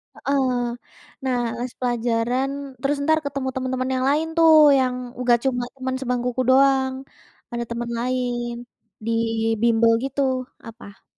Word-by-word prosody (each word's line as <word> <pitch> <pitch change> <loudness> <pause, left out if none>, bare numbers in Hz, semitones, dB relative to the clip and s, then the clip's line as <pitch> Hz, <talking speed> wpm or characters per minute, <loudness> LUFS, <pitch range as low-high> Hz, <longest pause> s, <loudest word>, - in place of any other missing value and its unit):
Heeh. 265 -3 0 0.7
Nah, 255 -2 0 0.2
les 250 0 -4
pelajaran 240 +1 0 0.3
terus 285 +1 0
entar 315 +1 +3
ketemu 275 -2 -3
temen-temen 255 0 -2
yang 255 0 0
lain 310 +3 +1
tuh, 325 -1 +6 0.3
yang 255 -1 +1 0.3
nggak 245 -1 +4
cuma 245 -2 0
temen 260 -1 -3
sebangkuku 250 -1 -1
doang. 265 0 +4 0.6
Ada 235 0 -3
temen 235 0 -4
lain, 245 -1 -2 0.5
di 230 - -1 0.5
bimbel 230 -1 +4
gitu 275 +1 -2 0.5
apa? 220 -3 -13
255 Hz, 130 wpm, -22 LUFS, 240-265 Hz, 0.7 s, tuh